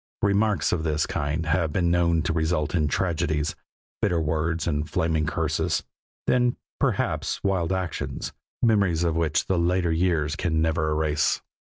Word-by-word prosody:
Remarks 105 0 +2
of 85 - 0
this 75 -1 0
kind 75 +3 -2
have 80 0 +1
been 85 +1 +1
known 85 -2 +2
to 80 - 0
result 80 -2 0
in 80 -4 +2
tragedies, 75 -2 0 0.5
bitter 90 -5 +2
words 80 +1 -1
and 75 -1 -1
flaming 80 -1 0
curses 80 -1 0 0.4
then, 125 -1 +2 0.2
perhaps, - - 0
wild 95 -3 +1
actions, 95 -3 -3 0.3
memories 100 -8 +3
of 85 -2 +1
which 80 -1 +1
the 95 -2 +1
later 85 0 +1
years 80 -2 +1
can 85 -4 0
never 80 -1 +1
erase. 75 -1 +1
80 Hz, 150 wpm, -25 LUFS, 80-90 Hz, 0.5 s, memories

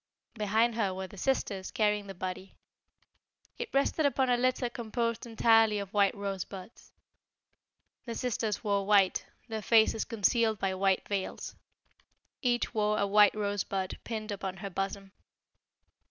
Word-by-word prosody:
Behind 220 +2 +1
her 200 -5 -1
were 190 0 -4
the 190 - -12
sisters 200 -6 -1
carrying 210 -1 0
the 195 - -8
body. 185 +1 -6 1.0
It 475 -2 -4
rested 275 +3 +1
upon 270 -3 +2
a - - +5
litter 255 +1 +1
composed 235 0 -3
entirely 225 -1 +4
of 200 -1 -5
white 200 -2 +3
rosebuds. 195 0 -7 1.1
The 235 -2 -5
sisters 225 -4 -2
wore 200 -1 +1
white, 200 -3 +3 0.2
their 220 -2 -4
faces 220 0 +4
concealed 225 0 +1
by 195 -1 -1
white 190 0 +1
veils. 200 -2 -4 0.9
Each 245 -2 0
wore 210 -1 +1
a 200 - +2
white 205 +1 +5
rosebud 200 -2 -2
pinned 220 -2 -5
upon 195 -2 -4
her 195 +1 -6
bosom. 195 +1 -4
210 Hz, 140 wpm, -30 LUFS, 195-230 Hz, 1.1 s, a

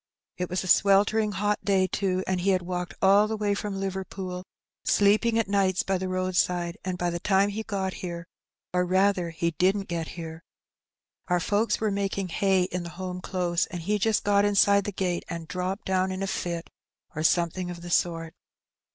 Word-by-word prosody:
It 180 -1 -3
was 180 +1 -1
a - - -5
sweltering 205 +3 +4
hot 205 +2 0
day, 195 -2 +3
too, 185 -1 -1
and 185 -1 -1
he 195 - +1
had 185 -2 +2
walked 180 0 -4
all 200 +2 +6
the 220 0 -3
way 205 -1 +1
from 200 -1 -3
Liverpool, 190 -1 -4 0.4
sleeping 215 +3 +3
at 225 - +1
nights 195 -2 +2
by 190 -1 0
the 185 - -3
roadside, 180 -1 0
and 185 -1 -3
by 175 -1 -1
the 170 - -3
time 195 +2 +3
he 210 +2 -3
got 195 -4 -3
here 170 -2 -5 0.2
— - - -65
or, 180 0 +2
rather, 185 -1 +2
he 170 +1 -1
didn't 190 +4 +1
get 170 -2 -3
here— 165 -1 -7 0.9
our 180 -1 +2
folks 210 +4 +1
were 215 -1 0
making 195 -1 -2
hay 190 +1 +2
in 180 0 -3
the 170 - -6
home 180 -1 -5
close, 175 -2 -1
and 175 -2 -6
he 210 +4 0
just 220 +1 +1
got 200 0 +3
inside 200 -1 +4
the 205 - -2
gate, 180 -2 -2
and 170 -1 -5
dropped 185 +3 -3
down 190 0 +1
in 185 +1 -3
a - - -1
fit, 170 -3 -3 0.4
or 155 - -2
something 175 +2 +1
of 175 -1 -7
the 175 - -7
sort. 165 -2 0
185 Hz, 200 wpm, -27 LUFS, 175-200 Hz, 0.9 s, all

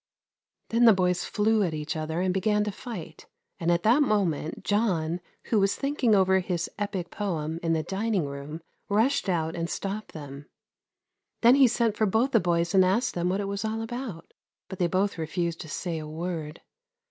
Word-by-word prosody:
Then 235 +1 +4
the 225 - +9
boys 180 -1 +1
flew 220 +1 +2
at 170 -5 0
each 150 +1 -4
other 160 +2 -2
and 185 0 +1
began 210 +2 +2
to 210 - -2
fight; 190 -8 -8 0.3
and 170 0 +1
at 170 0 +1
that 240 +7 +5
moment 185 - 0
John, 180 -6 0 0.2
who 220 - +1
was 195 0 +2
thinking 275 -6 +1
over 190 -1 +4
his 175 -2 -2
epick 195 -4 -3
poem 165 -6 -3
in 165 -1 +1
the 160 -1 0
dining 195 -2 -1
room, 140 +3 -7 0.3
rushed 220 +2 +2
out 165 -3 0
and 170 0 -3
stopped 200 +2 -4
them. 145 -2 -9 0.9
Then 235 +1 +7
he 270 -1 +7
sent 230 -2 +1
for 215 - +2
both 225 +7 +2
the 230 - +5
boys 170 -1 0
and 190 -1 +6
asked 220 +8 +1
them 175 0 0
what 190 +2 0
it 200 - -3
was 200 +1 -3
all 220 +1 -2
about, 230 -7 -6 0.4
but 190 - -7
they 175 - +3
both 190 +1 0
refused 165 +1 -2
to 160 - -9
say 165 +2 -3
a 155 - -7
word. 160 0 -5
185 Hz, 195 wpm, -27 LUFS, 165-215 Hz, 0.9 s, the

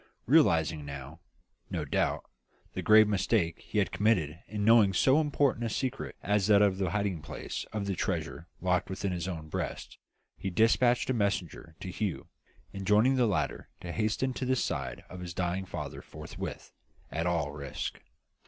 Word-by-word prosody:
Realising 85 - +4
now, 70 +2 -8 0.5
no - - -2
doubt, - - 0 0.5
the - - -3
grave 110 0 +7
mistake 95 -4 +1
he - - -6
had - - +2
committed 90 -8 +1
in 105 0 -2
keeping 110 -3 +6
so 135 +9 +4
important 145 -5 +1
a 115 - 0
secret 130 +4 -3
as 105 -1 +2
that 105 -1 +6
of 100 -2 +2
the 95 -3 +1
hiding 100 -4 -1
place 75 -2 -6
of 105 -2 -2
the 100 - -1
treasure 85 - -3
locked 90 -1 +1
within 95 0 -2
his 90 -1 -3
own 80 -4 -5
breast, - - -5 0.4
he 95 - -4
despatched 120 +6 +3
a - - +1
messenger 95 - -2
to 95 - -5
Hugh, 100 -1 -3 0.4
enjoining 105 +6 +3
the 125 -2 +3
latter 90 -7 -1
to 85 - -5
hasten 110 +6 0
to 130 - -3
the 130 +1 +2
side - - -2
of 90 - -9
his 90 -1 -7
dying 90 +1 -1
father - - -6
forthwith, - - -8 0.4
at 80 +2 -1
all 80 -4 0
risks. 70 -2 -5
100 Hz, 170 wpm, -30 LUFS, 85-110 Hz, 0.5 s, grave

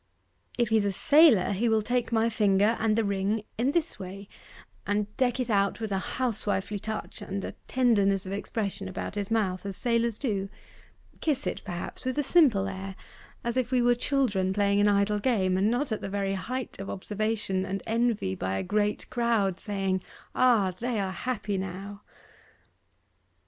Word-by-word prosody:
'If 240 -3 +2
he's 220 -2 +3
a 200 - +1
sailor, 280 - +5
he 220 +4 +1
will 220 -1 +2
take 245 +1 -1
my 225 0 +3
finger 210 0 +3
and 220 -1 +2
the 225 - +2
ring 200 +1 0 0.2
in 250 +3 +2
this 330 +2 -1
way, 195 +2 -8 0.6
and 210 0 -1
deck 255 -1 +1
it 250 -2 -1
out 200 0 +2
with 220 -2 -4
a 195 - +1 0.2
housewifely 210 -4 -1
touch 220 +2 -5
and 195 0 -4
a - - -4 0.2
tenderness 200 -7 +2
of 190 - -6
expression 200 -1 -3
about 185 - -5
his 205 -1 -3
mouth, 195 -5 0
as 195 -2 -5
sailors 235 -2 +1
do: 200 -7 -2 0.7
kiss 295 -3 0
it, - - -2
perhaps, 175 -3 -6
with 255 +1 -2
a 295 - +2
simple 260 - +4
air, 195 0 -6 0.5
as 235 0 -2
if 250 -2 +1
we 255 -1 +2
were 245 0 +5
children 235 -8 +1
playing 200 0 +2
an 205 - +4
idle 205 +1 +2
game, 200 -5 +1
and 195 +3 +2
not 245 +3 0
at 220 - -2
the - - -4
very 195 0 -1
height 250 +6 -4
of 195 - -5
observation 210 -1 -2
and 195 +1 -4
envy 225 - 0
by 95 +1 -2
a - - -2
great 210 +2 0
crowd 225 -6 +1
saying, 195 -2 -1 0.3
"Ah! 230 -7 +4
they 240 -2 -1
are 190 -1 -1
happy 210 -2 -2
now!" 195 +2 -6
210 Hz, 180 wpm, -28 LUFS, 195-235 Hz, 0.7 s, sailor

